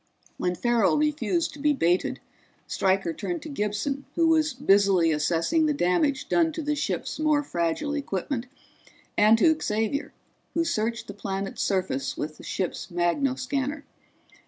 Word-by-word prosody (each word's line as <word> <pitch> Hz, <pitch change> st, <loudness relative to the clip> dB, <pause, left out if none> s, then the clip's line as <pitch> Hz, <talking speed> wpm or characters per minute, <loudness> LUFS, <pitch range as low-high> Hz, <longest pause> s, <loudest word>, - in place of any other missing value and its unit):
When 180 Hz, 0 st, -1 dB
Farrell 235 Hz, -, +2 dB
refused 305 Hz, +3 st, 0 dB
to 290 Hz, -, -11 dB
be 295 Hz, +1 st, +3 dB
baited 175 Hz, -8 st, +1 dB, 0.5 s
Stryker 190 Hz, -3 st, +1 dB
turned 340 Hz, -, -4 dB
to 315 Hz, -, -7 dB
Gibson, 270 Hz, +3 st, -2 dB
who 335 Hz, -, +3 dB
was 315 Hz, -1 st, +3 dB
busily 195 Hz, -, +4 dB
assessing 170 Hz, -, +1 dB
the 300 Hz, -, +1 dB
damage 265 Hz, +7 st, +1 dB
done 330 Hz, -1 st, +3 dB
to 320 Hz, -, -4 dB
the 300 Hz, +1 st, 0 dB
ship's 295 Hz, -, -3 dB
more 305 Hz, -1 st, +2 dB
fragile 175 Hz, -, -1 dB
equipment, 255 Hz, -2 st, -3 dB, 0.7 s
and 215 Hz, +2 st, +6 dB
to 315 Hz, +7 st, +5 dB
Xavier, 220 Hz, +6 st, -1 dB, 0.4 s
who 335 Hz, 0 st, +2 dB
searched 230 Hz, -4 st, -1 dB
the 200 Hz, -, -8 dB
planet's 195 Hz, -1 st, -4 dB
surface 185 Hz, -9 st, -1 dB
with 155 Hz, 0 st, -4 dB
the -, -, -13 dB
ship's 185 Hz, -3 st, -3 dB
magnoscanner. 260 Hz, -, -1 dB
240 Hz, 145 wpm, -26 LUFS, 190-295 Hz, 0.7 s, and